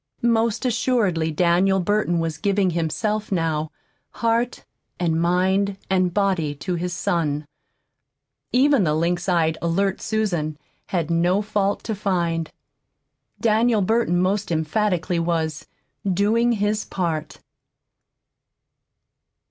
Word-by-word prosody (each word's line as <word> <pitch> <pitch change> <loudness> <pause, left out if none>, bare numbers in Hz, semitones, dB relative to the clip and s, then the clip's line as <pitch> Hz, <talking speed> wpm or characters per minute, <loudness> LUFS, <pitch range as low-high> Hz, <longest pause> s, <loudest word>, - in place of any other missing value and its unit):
Most 230 0 +1
assuredly 220 -9 +1
Daniel 180 +4 +2
Burton 195 -1 +1
was 165 -2 -2
giving 200 -1 +1
himself 210 +7 -2
now, 160 -4 0 0.4
heart 230 +1 -1 0.3
and 165 -2 +1
mind 190 +3 +1
and 185 -1 +2
body, 185 -6 0
to 180 +6 -4
his 175 +1 -2
son. 155 -4 -1 1.1
Even 270 -2 +4
the 155 -3 +1
lynx 175 +3 0
eyed, 160 -3 +1
alert 190 +3 0
Susan 175 -9 -1 0.3
had 170 -3 -1
no 175 +4 +2
fault 205 -1 -1
to 220 - -3
find. 170 -5 -1 0.9
Daniel 225 -1 +3
Burton, 220 -4 +1
most 195 +2 0
emphatically, 175 +2 0
was 165 -2 -2 0.4
"doing 220 +6 +2
his 210 0 0
part." 165 -4 -3
185 Hz, 110 wpm, -23 LUFS, 165-210 Hz, 1.1 s, Even